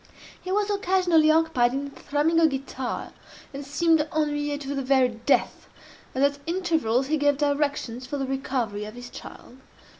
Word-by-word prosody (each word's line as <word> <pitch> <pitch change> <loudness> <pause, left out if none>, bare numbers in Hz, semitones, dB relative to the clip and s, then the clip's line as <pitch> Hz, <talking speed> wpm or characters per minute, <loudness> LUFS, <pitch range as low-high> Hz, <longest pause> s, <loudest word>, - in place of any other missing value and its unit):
He 370 - -4
was 415 +1 +1
occasionally 365 -6 +3
occupied 310 -7 +3
in 280 +1 -3
thrumming 300 +4 0
a 325 - +6
guitar, 265 -3 -4 0.4
and 280 +1 -6
seemed 320 +3 +2
ennuye 295 -1 -1
to 275 0 -4
the 275 - -2
very 260 -1 +3
death, 230 +4 0 0.5
as 265 - +1
at 285 0 +2
intervals 325 -9 +1
he 310 +3 0
gave 290 -1 +2
directions 285 -4 -1
for 290 - -3
the 270 - -2
recovery 255 -6 -2
of 215 +2 -9
his 245 0 -10
child. 250 - -11
285 Hz, 160 wpm, -25 LUFS, 265-315 Hz, 0.5 s, a